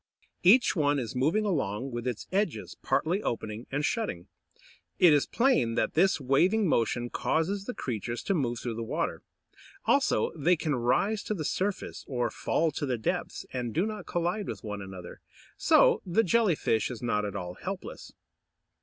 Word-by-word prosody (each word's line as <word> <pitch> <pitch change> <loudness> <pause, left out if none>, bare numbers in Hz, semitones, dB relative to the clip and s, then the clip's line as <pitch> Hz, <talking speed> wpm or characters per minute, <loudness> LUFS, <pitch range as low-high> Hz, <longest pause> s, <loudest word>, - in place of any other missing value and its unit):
Each 225 +8 +5
one 145 -3 +2
is 120 -4 -4
moving 160 +12 +2
along, 135 - -1
with 120 +1 -4
its 120 -4 -3
edges 195 -2 -1
partly 180 +6 +1
opening 110 - -4
and 145 +2 0
shutting. 205 - -2 0.7
It 175 -4 +7
is 145 - +3
plain 235 - +2
that - - 0
this 190 +1 +3
waving 180 +11 +3
motion 120 -3 0
causes 195 +5 -1
the 250 - -5
creatures 120 -1 -4
to 195 - 0
move 125 -8 0
through 120 0 -4
the - - -3
water. 115 - -2 0.6
Also, 110 - +2
they 170 +3 +3
can 155 -2 -2
rise 165 - +1
to 215 - -2
the 155 -5 -4
surface, 195 +5 -2
or 120 -4 -1
fall 165 +7 0
to 145 0 -3
the 125 -2 0
depths, 110 - -3
and 120 -3 -3
do 175 - +2
not 215 -1 -5
collide 175 +4 -1
with - - -6
one 105 -2 -5
another. 95 -2 -9 0.3
So - - +4
the 190 +5 +2
Jelly 215 -2 +3
fish 110 -6 0
is 125 -1 -7
not 105 -3 0
at 105 0 -4
all 90 -2 -4
helpless. - - -7
145 Hz, 175 wpm, -28 LUFS, 120-190 Hz, 0.7 s, It